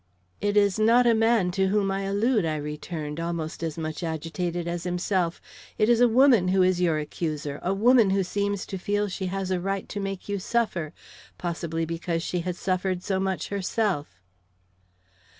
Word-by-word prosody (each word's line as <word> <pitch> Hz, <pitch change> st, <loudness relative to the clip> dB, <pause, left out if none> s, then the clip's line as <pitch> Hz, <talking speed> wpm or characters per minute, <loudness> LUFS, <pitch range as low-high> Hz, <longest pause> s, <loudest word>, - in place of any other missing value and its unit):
"It 205 Hz, +1 st, +1 dB
is 205 Hz, 0 st, +3 dB
not 230 Hz, +3 st, +5 dB
a 235 Hz, -, +5 dB
man 225 Hz, -4 st, +3 dB
to 190 Hz, +1 st, +1 dB
whom 200 Hz, 0 st, +1 dB
I 195 Hz, 0 st, -2 dB
allude," 210 Hz, +3 st, +1 dB
I 160 Hz, -1 st, -1 dB
returned, 150 Hz, +1 st, -5 dB
almost 165 Hz, -1 st, -3 dB
as 165 Hz, -2 st, -3 dB
much 155 Hz, 0 st, -4 dB
agitated 165 Hz, +1 st, -3 dB
as 170 Hz, 0 st, -3 dB
himself. 180 Hz, -1 st, -1 dB, 0.4 s
"It 215 Hz, -, +3 dB
is 240 Hz, 0 st, +4 dB
a 245 Hz, -, +7 dB
woman 240 Hz, -5 st, +5 dB
who 185 Hz, 0 st, +3 dB
is 180 Hz, -1 st, +2 dB
your 165 Hz, -3 st, +2 dB
accuser, 150 Hz, -2 st, -4 dB
a 180 Hz, -, -1 dB
woman 225 Hz, +2 st, +5 dB
who 195 Hz, 0 st, +2 dB
seems 200 Hz, +1 st, -2 dB
to 190 Hz, -, -6 dB
feel 205 Hz, +2 st, 0 dB
she 190 Hz, 0 st, -3 dB
has 190 Hz, 0 st, -3 dB
a 185 Hz, -, +1 dB
right 195 Hz, +1 st, -2 dB
to 205 Hz, -, -4 dB
make 195 Hz, -1 st, -4 dB
you 200 Hz, -1 st, -2 dB
suffer, 185 Hz, -7 st, -1 dB, 0.5 s
possibly 165 Hz, -1 st, -3 dB
because 165 Hz, 0 st, -2 dB
she 180 Hz, -, -2 dB
has 180 Hz, +1 st, -3 dB
suffered 185 Hz, -1 st, -1 dB
so 190 Hz, -1 st, 0 dB
much 190 Hz, -1 st, -2 dB
herself." 195 Hz, -, -1 dB
185 Hz, 185 wpm, -26 LUFS, 170-205 Hz, 0.5 s, a